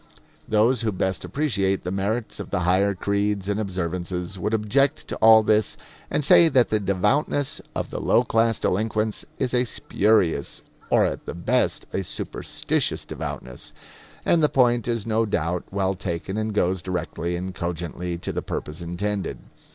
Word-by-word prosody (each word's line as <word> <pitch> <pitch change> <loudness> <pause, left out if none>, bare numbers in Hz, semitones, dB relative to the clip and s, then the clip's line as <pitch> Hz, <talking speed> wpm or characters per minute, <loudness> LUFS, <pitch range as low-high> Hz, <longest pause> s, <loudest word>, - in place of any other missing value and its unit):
Those 110 +3 +3
who 110 -2 0
best 95 -1 -1
appreciate 100 -10 0
the 90 - -3
merits 105 +4 -2
of - - -6
the 100 - -1
higher 95 +3 +2
creeds 100 0 -1
and 100 +1 0
observances 90 -1 -3
would 105 +3 -1
object 120 +7 +1
to - - -2
all 110 0 +7
this 105 0 +2 0.3
and 150 - 0
say 165 +3 +7
that 130 -4 +3
the 110 - +2
devoutness 105 - 0
of - - -3
the - - -4
low - - +4
class 115 0 +2
delinquents 110 +2 -1
is 130 -2 -1
a 125 0 +3
spurious, 105 - +1 0.3
or - - +4
at - - -4
the - - -4
best 85 - +1
a 95 - -1
superstitious - - -2
devoutness; 65 -1 -6 0.5
and 170 - +4
the 150 - +4
point 120 -3 +3
is 115 -3 -1
no 110 0 +1
doubt 90 -4 -1
well 95 -1 0
taken 90 0 -4
and 110 -1 -2
goes 95 -2 +1
directly 90 -1 -3
and 90 +2 -4
cogently 85 0 -4
to 85 - -5
the - - -2
purpose 75 +2 -5
intended. 95 +4 -3
100 Hz, 165 wpm, -24 LUFS, 90-110 Hz, 0.5 s, all